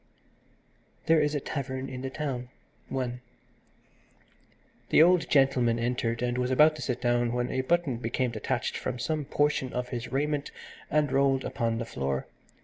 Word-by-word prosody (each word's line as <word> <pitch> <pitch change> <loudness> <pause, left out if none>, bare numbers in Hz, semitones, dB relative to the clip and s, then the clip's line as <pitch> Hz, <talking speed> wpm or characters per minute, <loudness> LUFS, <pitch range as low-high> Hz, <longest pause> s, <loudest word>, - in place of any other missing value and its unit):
THERE 160 -1 +5
IS 150 0 +1
A - - +1
TAVERN 135 -1 -4
IN 130 -1 -6
THE 135 - -3
TOWN 130 -3 -4 0.4
I 125 -2 -2 1.7
The - - +7
old 180 0 +4
gentleman 135 -4 +3
entered, 115 0 -1
and 125 0 0
was 125 0 0
about 150 +4 +5
to - - -7
sit 125 -1 -2
down, 120 -1 +1
when 125 0 -1
a 130 - 0
button 155 -2 +1
became 120 +2 -1
detached 110 -2 -2
from - - -3
some 150 +4 -2
portion 145 -2 0
of 125 0 -3
his 120 -1 -5
raiment 145 +1 -1 0.4
and 150 -2 +2
rolled 135 0 +2
upon 115 -3 -1
the 115 - -3
floor. 70 -8 -2
130 Hz, 160 wpm, -28 LUFS, 120-145 Hz, 1.7 s, The